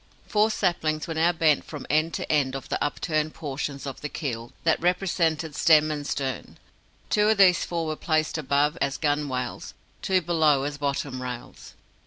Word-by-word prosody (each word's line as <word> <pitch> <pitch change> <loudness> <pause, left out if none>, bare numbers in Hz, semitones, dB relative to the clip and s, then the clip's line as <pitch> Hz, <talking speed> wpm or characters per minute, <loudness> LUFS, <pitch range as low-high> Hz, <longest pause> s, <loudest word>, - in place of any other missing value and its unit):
Four 215 +1 +2
saplings 160 -7 0
were 165 - -3
now 165 +2 +3
bent 160 -4 +2
from 150 - -8
end 155 +2 +1
to - - -3
end 140 -3 +1
of 135 - -7
the - - -1
upturned 155 +1 -1
portions 140 -1 -4
of 135 - -6
the 150 - -4
keel 120 -8 -5
that 160 - +2
represented 170 -3 0
stem 155 -1 +5
and 145 -1 -4
stern. 130 -4 -4 0.5
Two 210 0 +3
of 220 - +3
these 185 -3 +5
four 170 -1 -2
were 155 -1 -2
placed 155 0 0
above, 145 +3 +1
as 140 0 0
gunwales; 145 -5 -2 0.3
two 190 -1 +2
below 155 -5 +3
as 145 0 -4
bottom 140 -2 -2
rails. 125 -1 -8
155 Hz, 175 wpm, -26 LUFS, 140-165 Hz, 0.5 s, stem